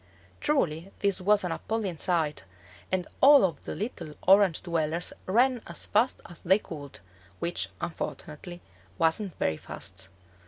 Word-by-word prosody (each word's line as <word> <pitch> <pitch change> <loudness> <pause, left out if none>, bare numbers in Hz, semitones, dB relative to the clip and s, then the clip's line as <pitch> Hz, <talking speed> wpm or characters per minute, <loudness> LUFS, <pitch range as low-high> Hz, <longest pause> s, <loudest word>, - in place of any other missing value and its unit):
Truly 185 - 0
this 200 -2 0
was 205 +2 +4
an 180 - -2
appalling 195 0 -2
sight, 160 - 0 0.5
and 185 -1 0
all 285 +1 +9
of 175 - -4
the - - -4
little 170 -8 -5
Orange 195 -3 +5
dwellers 165 -1 -1
ran 245 +5 +3
as - - -2
fast 250 +3 +2
as 175 - -12
they 190 +3 +4
could, 145 - -8 0.4
which, 130 - -1
unfortunately, 175 +1 -6 0.4
wasn't 165 - +1
very 80 - 0
fast. 95 +2 -5
175 Hz, 140 wpm, -28 LUFS, 160-200 Hz, 0.5 s, all